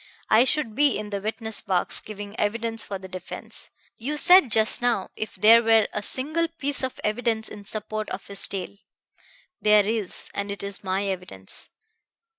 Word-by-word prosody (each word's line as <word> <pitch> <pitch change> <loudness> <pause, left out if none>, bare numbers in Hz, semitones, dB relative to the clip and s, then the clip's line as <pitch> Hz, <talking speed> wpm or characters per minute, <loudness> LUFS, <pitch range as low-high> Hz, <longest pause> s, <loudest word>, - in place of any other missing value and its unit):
I 225 +3 +6
should 270 -5 -1
be 285 +3 +3
in 210 0 -6
the 200 -1 -3
witness 220 +1 0
box, 185 -2 -1
giving 205 -1 -8
evidence 225 +2 -1
for 200 - -5
the 190 0 -10
defense. 185 -1 -6 0.3
You 285 +6 -2
said 360 -5 +7
just 220 +1 +3
now, 240 -6 0
'If 215 - -5
there 220 +4 +7
were 225 -1 +4
a 210 - -2
single 310 +10 -1
piece 285 -4 -2
of 260 -1 -3
evidence 220 0 -1
in 205 -1 -10
support 215 +1 -4
of 190 - -6
his 200 -1 +1
tale.' 195 +1 -6 0.8
There 210 -1 +5
is, 215 -3 -1
and 200 0 -3
it 200 0 -5
is 200 0 -4
my 190 +1 -1
evidence. 180 - -4
215 Hz, 175 wpm, -25 LUFS, 200-235 Hz, 0.8 s, said